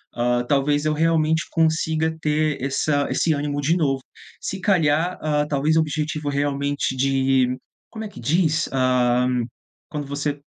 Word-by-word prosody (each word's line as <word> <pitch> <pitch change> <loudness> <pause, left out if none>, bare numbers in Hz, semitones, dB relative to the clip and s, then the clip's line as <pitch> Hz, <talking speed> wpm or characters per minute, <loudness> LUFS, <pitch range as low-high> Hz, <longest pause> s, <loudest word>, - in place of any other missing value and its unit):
hã, 120 0 +1
talvez 145 +2 +1
eu 155 - +2
realmente 160 0 +2
consiga 160 0 +1
ter 150 -2 0
essa 145 +1 0
esse 165 - +1
ânimo 145 0 -2
de 165 +5 +2
novo. 135 -5 0 0.4
Se 190 - -4
calhar, 175 -3 +2
hã, 150 -1 +1
talvez 150 +2 +1
objetivo 155 -1 -1
realmente 140 -1 -1
de 135 -1 +2 0.3
como 220 -1 -7
é 210 - -6
que - - -12
diz, 155 -1 +1
hã, 125 -1 +2 0.6
quando 150 -1 -4
você 145 0 -3
150 Hz, 140 wpm, -22 LUFS, 140-160 Hz, 0.6 s, eu